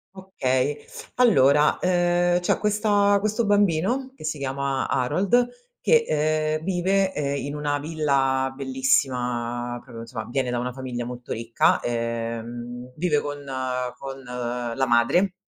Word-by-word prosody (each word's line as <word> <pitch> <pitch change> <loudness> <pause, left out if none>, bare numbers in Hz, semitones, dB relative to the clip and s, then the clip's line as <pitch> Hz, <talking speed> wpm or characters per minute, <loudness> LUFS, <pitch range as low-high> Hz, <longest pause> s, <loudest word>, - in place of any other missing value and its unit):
Okay. 145 -7 -1 0.4
Allora, 150 - +4
ehm, 175 -1 +2
c'è 175 - 0
questa 205 -1 +3
questo 215 +2 0
bambino 205 +7 +2
che - - -13
si 155 -1 -2
chiama 135 0 -2
Harold, 195 - +2 0.3
che, 470 -1 +4
ehm, 155 +1 0
vive, 190 +1 +1
ehm, 140 -1 -1
in 145 +1 -4
una 145 -1 -1
villa 135 -4 0
bellissima 125 -3 0
proprio 115 0 -10
insomma, 115 -1 -6
viene 125 -1 -1
da 120 - -1
una 125 +1 -2
famiglia 125 -2 -5
molto 125 0 -6
ricca. 115 0 +2
Ehm, 120 +1 -4
vive 155 -3 +1
con 145 0 -6 0.5
con 135 0 -7
la 125 +1 -2
madre, 175 +11 +3
140 Hz, 130 wpm, -24 LUFS, 125-175 Hz, 0.5 s, Allora